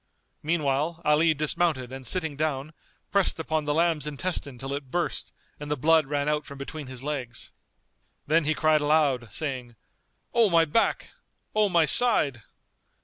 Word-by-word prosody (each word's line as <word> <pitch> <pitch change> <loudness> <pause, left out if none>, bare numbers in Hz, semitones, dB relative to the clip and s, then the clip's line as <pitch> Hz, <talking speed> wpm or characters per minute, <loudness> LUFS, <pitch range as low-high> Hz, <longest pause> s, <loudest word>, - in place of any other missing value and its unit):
Meanwhile 155 0 0
Ali 155 +2 +4
dismounted 150 -3 0
and 130 -1 -8
sitting 160 0 -1
down, 150 0 -2 0.4
pressed 200 -2 +3
upon 160 -1 -2
the 145 - 0
lamb's 165 -3 +1
intestine 150 -3 -3
till 135 +3 -5
it 140 -2 -6
burst 175 +6 -2 0.3
and 145 0 -7
the 150 - -1
blood 160 +2 +3
ran 145 0 -1
out 150 0 0
from 140 - -11
between 145 +1 -7
his 130 0 -7
legs. 135 -5 -5 0.7
Then 160 +1 +2
he 155 +1 +1
cried 155 -1 +3
aloud, 145 -6 +1
saying, 130 -6 -4 0.6
"O 230 -3 +4
my 165 -2 +4
back! 165 +10 0 0.4
O 215 -1 +3
my 170 -3 +4
side!" 150 - +3
150 Hz, 155 wpm, -26 LUFS, 140-165 Hz, 0.7 s, Ali